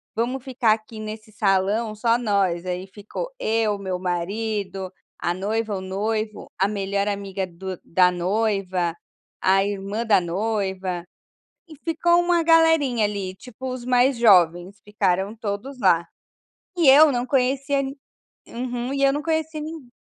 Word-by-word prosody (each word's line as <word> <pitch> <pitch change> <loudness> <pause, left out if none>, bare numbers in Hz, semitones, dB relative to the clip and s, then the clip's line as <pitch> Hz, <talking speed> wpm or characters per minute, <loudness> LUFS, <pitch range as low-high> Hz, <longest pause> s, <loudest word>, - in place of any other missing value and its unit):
“Vamos 245 +3 -1
ficar 250 -4 +2
aqui 215 0 -7
nesse 215 0 -7
salão, 210 +2 +1
só 230 +2 +2
nós”. 195 -6 0
Aí 180 +1 -4
ficou 205 - -7
eu, 220 -2 +1
meu 190 -2 -4
marido, 190 +1 -3 0.3
a 175 - 0
noiva, 210 +3 -2
o 190 - -4
noivo, 215 +3 -3
a 195 - +3
melhor 200 0 -1
amiga 200 -1 -3
do 185 +1 -7
da 180 +1 +3
noiva, 185 -2 0 0.5
a 195 +1 +4
irmã 205 +3 -3
da 210 -4 +5
noiva 190 -1 -2 0.6
e 315 - -12
ficou 335 +3 +2
uma 345 -1 +2
galerinha 325 -8 +4
ali, 195 -2 -3
tipo 250 +4 -9
os 255 -1 -6
mais 255 +1 +3
jovens 185 -3 +4
ficaram 200 0 0
todos 225 +5 -5
lá, 180 -5 +4 0.7
e 330 - +3
eu 295 +3 +8
não 245 -1 -1
conhecia 270 +2 +1
ni 275 +1 -5 0.5
Uhum, 245 +1 -4
e 275 - -2
eu 275 - +4
não 295 - -2
conhecia 315 -1 -1
nin 310 -3 -7
215 Hz, 145 wpm, -23 LUFS, 190-250 Hz, 0.7 s, eu